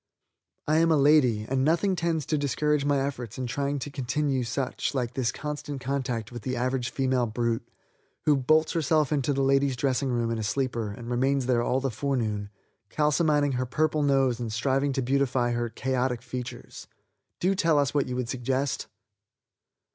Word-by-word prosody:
I 155 Hz, +1 st, +3 dB
am 165 Hz, 0 st, +3 dB
a 155 Hz, -, +4 dB
lady, 135 Hz, -7 st, +4 dB
and 130 Hz, 0 st, 0 dB
nothing 170 Hz, +6 st, +2 dB
tends 165 Hz, -3 st, -1 dB
to 155 Hz, -, 0 dB
discourage 145 Hz, +1 st, +1 dB
my 145 Hz, -1 st, +2 dB
efforts 125 Hz, -5 st, -4 dB
in 130 Hz, -, -3 dB
trying 140 Hz, +3 st, -1 dB
to 140 Hz, +1 st, -5 dB
continue 135 Hz, 0 st, -1 dB
such 125 Hz, +4 st, -2 dB
like 125 Hz, -2 st, -1 dB
this 125 Hz, -3 st, 0 dB
constant 145 Hz, -1 st, -5 dB
contact 125 Hz, -4 st, -3 dB
with 120 Hz, -1 st, -7 dB
the 130 Hz, +3 st, -3 dB
average 125 Hz, 0 st, -1 dB
female 130 Hz, -2 st, 0 dB
brute 115 Hz, +1 st, -2 dB, 0.6 s
who 150 Hz, -, +5 dB
bolts 155 Hz, +4 st, +3 dB
herself 155 Hz, -2 st, +1 dB
into 145 Hz, -2 st, +1 dB
the 135 Hz, -1 st, +1 dB
ladies' 135 Hz, 0 st, +3 dB
dressing 130 Hz, +1 st, 0 dB
room 120 Hz, -2 st, 0 dB
in 115 Hz, -, -2 dB
a -, -, -2 dB
sleeper 115 Hz, -1 st, -1 dB
and 120 Hz, +3 st, -7 dB
remains 135 Hz, +2 st, +1 dB
there 125 Hz, -2 st, +2 dB
all 125 Hz, +2 st, +1 dB
the 135 Hz, -1 st, -1 dB
forenoon 110 Hz, -5 st, -2 dB, 0.4 s
calcimining 150 Hz, -1 st, +2 dB
her 130 Hz, 0 st, -1 dB
purple 155 Hz, +3 st, +1 dB
nose 135 Hz, -4 st, +2 dB
and 115 Hz, -2 st, -3 dB
striving 135 Hz, +5 st, +1 dB
to 135 Hz, -1 st, -1 dB
beautify 130 Hz, -2 st, +1 dB
her 120 Hz, 0 st, -1 dB
chaotic 125 Hz, +1 st, -1 dB
features. 125 Hz, 0 st, -7 dB, 0.5 s
Do 185 Hz, +2 st, +2 dB
tell 165 Hz, -5 st, +2 dB
us 140 Hz, -4 st, +2 dB
what 145 Hz, -2 st, +1 dB
you 125 Hz, -, -3 dB
would 125 Hz, -1 st, -2 dB
suggest." 130 Hz, +2 st, -2 dB
135 Hz, 180 wpm, -27 LUFS, 120-145 Hz, 0.6 s, who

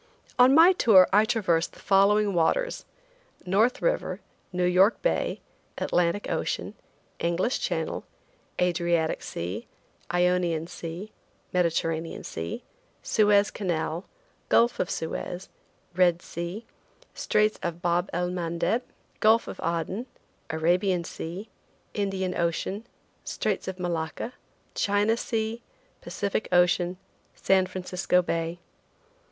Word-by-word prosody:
On 255 Hz, +2 st, +7 dB
my 335 Hz, +4 st, +8 dB
tour 200 Hz, -, +6 dB
I 210 Hz, +2 st, +6 dB
traversed 185 Hz, -8 st, +1 dB
the -, -, -16 dB
following 200 Hz, +1 st, +3 dB
waters: 340 Hz, -, +1 dB, 0.6 s
North 210 Hz, +7 st, +2 dB
River, -, -, 0 dB, 0.3 s
New 180 Hz, -1 st, 0 dB
York 185 Hz, +5 st, +4 dB
Bay, -, -, 0 dB, 0.4 s
Atlantic 175 Hz, +3 st, 0 dB
Ocean, -, -, -2 dB, 0.5 s
English 175 Hz, +8 st, 0 dB
Channel, -, -, -2 dB, 0.6 s
Adriatic 170 Hz, -2 st, +1 dB
Sea, 90 Hz, +7 st, -5 dB, 0.4 s
Ionian 175 Hz, -2 st, +1 dB
Sea, 170 Hz, +5 st, -7 dB, 0.4 s
Mediterranean 165 Hz, -2 st, 0 dB
Sea, 80 Hz, +1 st, -5 dB, 0.4 s
Suez 205 Hz, -1 st, +3 dB
Canal, 175 Hz, -2 st, -2 dB, 0.4 s
Gulf 235 Hz, +1 st, +4 dB
of 180 Hz, -, 0 dB
Suez, 175 Hz, +3 st, -4 dB, 0.5 s
Red 175 Hz, -1 st, +3 dB
Sea, 175 Hz, +7 st, -6 dB, 0.5 s
Straits 215 Hz, 0 st, +1 dB
of 170 Hz, 0 st, -4 dB
Bab 175 Hz, +2 st, +1 dB
el 180 Hz, +1 st, -1 dB
Mandeb, 175 Hz, +6 st, -1 dB, 0.4 s
Gulf 220 Hz, +2 st, +4 dB
of -, -, -7 dB
Aden, 170 Hz, +8 st, -2 dB, 0.4 s
Arabian 175 Hz, +3 st, +1 dB
Sea, 175 Hz, +5 st, -6 dB, 0.5 s
Indian 195 Hz, -2 st, -1 dB
Ocean, 190 Hz, +6 st, -2 dB, 0.4 s
Straits 210 Hz, -3 st, -2 dB
of 190 Hz, -1 st, -4 dB
Malacca, 175 Hz, +6 st, -3 dB, 0.4 s
China 205 Hz, +2 st, +2 dB
Sea, 225 Hz, 0 st, -2 dB, 0.4 s
Pacific 200 Hz, +1 st, -2 dB
Ocean, 180 Hz, 0 st, +3 dB, 0.4 s
San 190 Hz, -1 st, +3 dB
Francisco 180 Hz, 0 st, 0 dB
Bay. 165 Hz, 0 st, -2 dB
180 Hz, 105 wpm, -27 LUFS, 170-210 Hz, 0.6 s, my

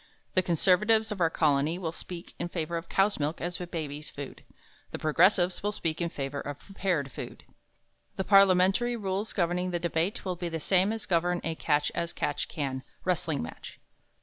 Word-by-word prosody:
The 185 Hz, -, +4 dB
Conservatives 205 Hz, +6 st, +3 dB
of 200 Hz, -3 st, -4 dB
our 165 Hz, -, +5 dB
Colony 155 Hz, +1 st, +2 dB
will 170 Hz, -3 st, -3 dB
speak 170 Hz, +1 st, -9 dB
in 175 Hz, -, -2 dB
favor 170 Hz, -1 st, -3 dB
of 165 Hz, +1 st, -4 dB
cow's 195 Hz, -1 st, +2 dB
milk 150 Hz, +2 st, -1 dB
as 175 Hz, +1 st, -3 dB
a 175 Hz, -, -4 dB
baby's 150 Hz, -3 st, -5 dB
food. 140 Hz, -1 st, -8 dB, 0.5 s
The -, -, -5 dB
Progressives 175 Hz, +3 st, +3 dB
will 205 Hz, -, 0 dB
speak 165 Hz, -4 st, -2 dB
in 170 Hz, -, 0 dB
favor 140 Hz, -2 st, -4 dB
of 145 Hz, 0 st, -5 dB
prepared 180 Hz, -8 st, -2 dB
food. -, -, -8 dB, 0.7 s
The 190 Hz, -, -1 dB
parliamentary 195 Hz, +4 st, +5 dB
rules 200 Hz, -1 st, -2 dB
governing 180 Hz, 0 st, 0 dB
the 175 Hz, -, 0 dB
debate 170 Hz, +3 st, -1 dB
will 185 Hz, -1 st, -1 dB
be 175 Hz, 0 st, -3 dB
the 165 Hz, -1 st, -3 dB
same 190 Hz, +5 st, +3 dB
as 225 Hz, -1 st, -4 dB
govern 175 Hz, 0 st, +1 dB
a 165 Hz, -, -1 dB
"catch 150 Hz, -2 st, +1 dB
as 170 Hz, 0 st, -2 dB
catch 145 Hz, -, -2 dB
can" 135 Hz, -3 st, -3 dB, 0.2 s
wrestling 165 Hz, -, 0 dB
match. 80 Hz, -, -9 dB
175 Hz, 185 wpm, -29 LUFS, 155-190 Hz, 0.7 s, our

